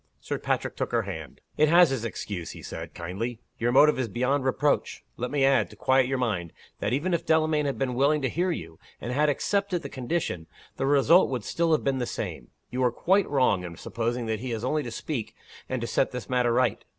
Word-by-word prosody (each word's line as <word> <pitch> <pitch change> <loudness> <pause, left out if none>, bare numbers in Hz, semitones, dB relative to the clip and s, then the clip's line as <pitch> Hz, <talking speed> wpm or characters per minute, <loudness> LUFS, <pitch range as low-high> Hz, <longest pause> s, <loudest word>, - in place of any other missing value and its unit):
Sir - - -4
Patrick - - -1
took - - -3
her - - +2
hand. - - -7 0.2
"It 155 0 +4
has 170 -2 +6
its 130 -4 -2
excuse," 100 -6 -5
he - - -11
said, 80 0 -7
kindly. 95 +8 -4 0.2
"Your 120 +1 +1
motive 150 +2 +5
is 130 - 0
beyond 130 +6 0
reproach. 140 +2 0
Let 125 +1 -3
me 140 -2 +2
add 135 -1 +3
to - - -13
quiet 130 -1 +3
your 135 0 0
mind 100 -10 -2 0.3
that, - - -1
even 155 +8 0
if 170 - 0
Delamayn 155 -2 +2
had 140 - -2
been 130 -2 -1
willing 140 +3 +2
to - - +2
hear 175 +9 0
you, 80 - -5 0.2
and 120 - -4
had 150 +3 +3
accepted 195 +3 0
the - - -5
condition, 125 - -3 0.3
the 135 - 0
result 145 +6 +5
would 125 -5 -3
still 170 +7 0
have 155 - +2
been 135 -1 0
the 120 - -1
same. - - -5 0.2
You 130 +1 -1
are 125 - +3
quite 190 +10 +2
wrong 125 -10 +2
in 85 -2 -7
supposing 120 +1 -2
that 110 -1 -2
he 130 +2 -5
has 115 -1 -3
only 150 +4 +1
to 125 - -5
speak, 115 -3 -4 0.3
and 130 - -1
to - - -2
set 130 - +1
this 125 -1 -6
matter 125 -2 +2
right. 125 +1 +1
130 Hz, 230 wpm, -27 LUFS, 115-150 Hz, 0.3 s, has